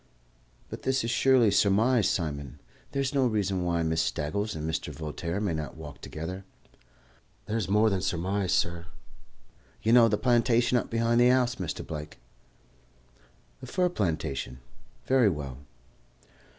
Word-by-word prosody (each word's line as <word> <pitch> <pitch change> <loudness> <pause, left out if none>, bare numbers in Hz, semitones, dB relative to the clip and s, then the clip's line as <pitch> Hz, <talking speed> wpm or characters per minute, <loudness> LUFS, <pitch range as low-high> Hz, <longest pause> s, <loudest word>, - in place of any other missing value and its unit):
"But - - -8
this 130 -1 0
is 115 0 -1
purely 125 -4 +4
surmise, 105 +2 +3
Simon. 70 -6 -3 0.3
There 140 - -1
is 130 - -2
no 135 -3 +3
reason 100 -5 -1
why 85 -1 0
Miss 80 0 +1
Staggles 95 +9 -2
and 80 0 -4
Mr. 80 -1 -3
Voltaire 80 +5 -4
may 100 -5 -1
not 75 -3 -5
walk 75 -3 -10
together." 90 +5 -6 1.0
"There's 110 -3 -2
more 105 +2 +4
than 95 -1 0
surmise, 95 +2 -1
sur. 85 0 0 1.0
You 115 - +3
know 120 -2 +7
the 105 -1 +1
plantation 120 0 +2
up - - -6
behind 115 +1 +2
the 120 - +6
house, 125 -1 +2
Mr. 90 -5 -4
Blake?" 75 -1 -7 1.4
"The - - -10
fir 180 -1 +1
plantation? 80 - -2 0.5
Very 130 -5 +4
well." 70 -6 -5
100 Hz, 145 wpm, -28 LUFS, 80-120 Hz, 1.4 s, know